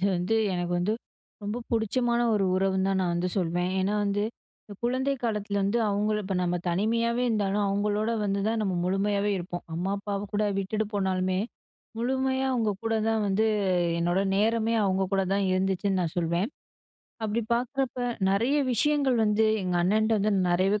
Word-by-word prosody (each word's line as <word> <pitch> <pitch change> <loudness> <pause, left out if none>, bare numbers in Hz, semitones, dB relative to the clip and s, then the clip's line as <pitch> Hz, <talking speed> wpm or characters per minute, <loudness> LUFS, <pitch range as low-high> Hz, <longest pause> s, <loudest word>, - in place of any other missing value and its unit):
இது 195 - +2
வந்து 180 +6 0 0.2
எனக்கு 175 -1 -2
வந்து 180 +5 0 0.5
ரொம்ப 205 +2 -3
புடிச்சமான 235 +2 +1
ஒரு 200 -2 +2
உறவுன்னு 190 0 +1
தான் 195 -1 +1
நான் 180 -2 0
வந்து 175 +1 0
சொல்வேன், 175 0 0
ஏனா 195 +2 0
வந்து 200 0 0 0.6
குழந்தை 260 +3 +1
காலத்தில 210 -3 -1
வந்து 200 +4 +1
அவுங்கள 210 +1 0
இப்ப 190 0 -3
நம்ம 180 0 0
தனிமையாவே 230 +6 +1
இருந்தாலும், 205 -2 +1
அவங்களோட 205 +2 0
வந்து 200 0 0
தான் 225 0 0
நம்ம 195 -3 -1
முழுமையாவே 200 +2 +1
இருப்போம். 175 0 -6
அம்மா, 180 +4 -2
அப்பாவ 200 0 -3
கூட 210 +1 +1
விட்டுட்டு 215 +3 -1
போனாலுமே, 185 -1 0 0.6
முழுமையா 265 +2 0
அவுங்க 230 -4 +1
கூட 225 0 0
தான் 225 -1 +1
வந்து 205 +3 +2 0.5
என்னோட 175 +2 +1 0.2
நேரமே, 225 +2 +2
அவுங்க 190 0 +1
கூட 195 0 +2
தான் 200 0 +1
இருந்துச்சுன்னு 190 +1 0
நான் 165 -2 -3
சொல்வேன். 170 +4 0 0.8
அப்டி 220 +2 0
பாக்குறப்ப, 255 +1 -2 0.3
நெறைய 230 +9 +2 0.2
விஷயங்கள் 275 +1 +2
வந்து 215 +1 +3 0.2
எங்க 180 -1 -1
அண்ணன்ட்ட 215 +4 +2
வந்து 210 +1 +1 0.2
நெறையவே 190 +4 +2
205 Hz, 160 wpm, -27 LUFS, 190-225 Hz, 0.8 s, வந்து